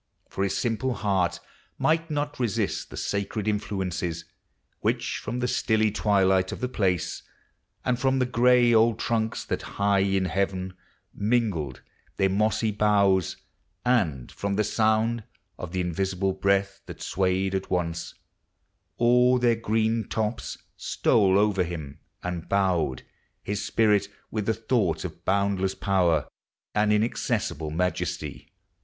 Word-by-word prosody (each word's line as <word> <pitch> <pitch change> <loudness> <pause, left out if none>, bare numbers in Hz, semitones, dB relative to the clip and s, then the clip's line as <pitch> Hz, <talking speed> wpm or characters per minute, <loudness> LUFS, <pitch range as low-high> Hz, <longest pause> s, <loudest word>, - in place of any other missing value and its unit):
For 95 - -2
his 100 - 0
simple 120 +2 -1
heart 95 -5 0 0.4
Might 165 +1 +1
not 145 -1 -2
resist 115 -6 -1
the - - -9
sacred 100 +1 -2
influences 90 -5 -2 0.5
Which, - - -1
from 125 +1 -4
the 125 - +1
stilly 110 -3 +2
twilight 95 -3 +2
of - - -5
the 125 - -1
place, 95 -8 -1 0.6
And 125 -1 +1
from 135 +1 +2
the 130 - +2
gray 125 0 +4
old 115 0 +4
trunks 110 -1 -1
that - - -2 0.2
high 100 0 +3
in 95 -1 +2
heaven 95 0 -1 0.4
Mingled 100 - -1 0.3
their 95 -1 +2
mossy 110 +2 +1
boughs, 100 -3 +2 0.5
and 90 - +1
from 100 0 -2
the 105 - +2
sound 110 +2 +1 0.4
Of 90 - -6
the 90 0 -1
invisible 95 +2 -1
breath 100 +1 +1
that - - -8
swayed 95 0 0
at 95 0 -2
once 85 -2 -2 0.8
All 125 +1 +4
their 120 -1 +3
given 110 -1 0
tops, 110 +1 -2 0.2
stole 95 -3 +2
over 100 -2 +3
him, 80 -5 -6 0.2
and 90 -1 -4
bowed 90 -9 +1 0.4
His 100 0 -3
spirit 105 -3 +2 0.2
with 105 -2 -2
the 110 - +2
thought 110 -7 0
of - - -8
boundless 95 -1 +1
power 90 -7 +2 0.5
And 105 0 +2
inaccessible 105 -7 0
majesty. 90 +4 -3
100 Hz, 135 wpm, -26 LUFS, 95-115 Hz, 0.8 s, gray